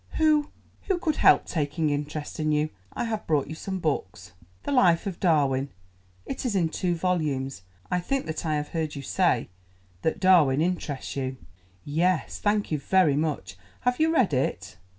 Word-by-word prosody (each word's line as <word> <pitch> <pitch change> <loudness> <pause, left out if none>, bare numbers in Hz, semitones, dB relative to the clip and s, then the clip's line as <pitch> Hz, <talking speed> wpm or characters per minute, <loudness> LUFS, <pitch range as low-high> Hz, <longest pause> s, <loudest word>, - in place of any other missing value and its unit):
Who—who 310 +4 0
could 315 -3 -1
help - - +5
taking 155 -1 -1
interest 145 +1 -4
in 155 0 +1
you? 150 +1 +1 0.2
I - - -3
have 225 -2 -3
brought 150 -4 +2
you 155 - -7
some 190 +4 -4
books—the 95 - -5
Life 185 -9 +4
of 190 -4 -4
Darwin—it 95 - -2
is 240 -6 -1
in 170 -4 +2
two 175 +2 -1
volumes. 150 - -1 0.3
I 180 - +2
think 270 +9 -2
that 160 0 -4
I 155 -2 0
have 150 0 -3
heard 160 -2 -3
you 140 - -6
say 170 - +1 0.5
that 160 - -1
Darwin 165 -8 +5
interests 160 -5 -2
you?" 130 -1 -3 0.5
"Yes, 165 +4 0
thank 205 -2 0
you 155 - 0
very 180 -2 +3
much. 145 - -2 0.2
Have 250 0 0
you 320 +1 +3
read 255 - +2
it?" 110 -6 -2
155 Hz, 165 wpm, -26 LUFS, 140-185 Hz, 0.5 s, help